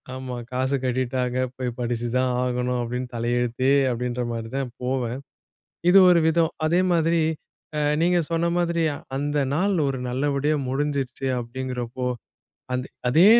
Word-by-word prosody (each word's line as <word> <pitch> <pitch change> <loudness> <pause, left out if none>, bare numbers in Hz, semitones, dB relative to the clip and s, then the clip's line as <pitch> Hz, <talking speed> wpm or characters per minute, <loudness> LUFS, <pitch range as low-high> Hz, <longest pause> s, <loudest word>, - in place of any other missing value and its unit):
ஆமா. 130 -1 -5 0.2
காசு 130 +2 0
கட்டிட்டாங்க, 125 0 0 0.2
போய் 130 -1 -1
படிச்சு 120 -1 -1
தான் 130 0 +2
ஆகணும் 125 0 0
அப்பிடின்னு 125 +2 -3
தலையெழுத்தே 120 +2 0 0.2
அப்பிடின்றமாரி 120 -1 -2
தான் 135 -3 -2
போவன். 125 -1 -1 0.7
இது 190 - +7
ஒரு 175 - +6
விதம்! 165 0 +3
அதே 170 +3 +3
மாதிரி 165 0 +2 0.8
நீங்க 175 +1 +3
ஆ - - -11
சொன்ன 170 +1 +1
மாதிரி, 170 -1 +1 0.3
அந்தநாள் 145 +6 +1
ஒரு 135 - -1
நல்லபடியா 145 +3 +1
முடிஞ்சுருச்சு 135 -1 -2
அப்பிடிங்கிறப்போ! 125 0 -4 0.7
அந்த 125 +1 -1 0.2
அதே 160 +9 +6
130 Hz, 125 wpm, -24 LUFS, 125-145 Hz, 0.8 s, இது